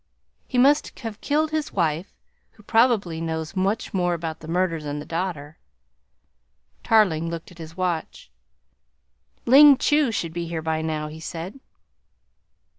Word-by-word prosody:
He 255 - -3
must 285 +5 +3
have 225 -3 -7
killed 310 +2 0
his 310 0 -2
wife, 170 0 -1 0.4
who 210 - -20
probably 215 -8 +2
knows 160 +1 -4
much 195 +5 -1
more 175 -2 +1
about 165 -1 -5
the 155 - -11
murder 170 -1 0
than 145 -1 -5
the 150 - -6
daughter." 165 -4 -4 1.2
Tarling 175 -8 +3
looked 165 +1 -7
at 175 - -17
his 160 +1 -10
watch. 180 - -3 1.1
"Ling 280 +3 +8
Chu 295 -3 +2
should 165 -6 -3
be 170 0 -4
here 165 -1 -4
by 160 0 -1
now," 155 -1 -3
he 155 +1 -9
said. 170 +8 -7
175 Hz, 145 wpm, -23 LUFS, 160-225 Hz, 1.2 s, Ling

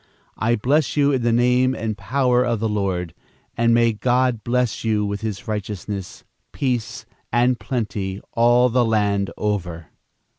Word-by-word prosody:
I 115 +2 +2
bless 135 +6 +1
you 145 0 +4
in 130 -3 0
the 120 0 +1
name 125 +2 +3
and 110 -3 -3
power 125 +4 +1
of 115 -3 -1
the 110 - 0
Lord, 95 -6 -2 0.4
and 115 0 +2
may 115 -1 +4
God 125 0 +1
bless 125 -2 0
you 110 -2 +1
with 100 +1 -3
his 105 -3 -5
righteousness, 105 -2 -5 0.3
peace 125 -5 -2 0.3
and 120 +1 +2
plenty 105 -5 -3
all 120 +2 +4
the 125 +1 +2
land 105 -3 +1
over." 90 -6 -3
115 Hz, 150 wpm, -21 LUFS, 105-125 Hz, 0.4 s, you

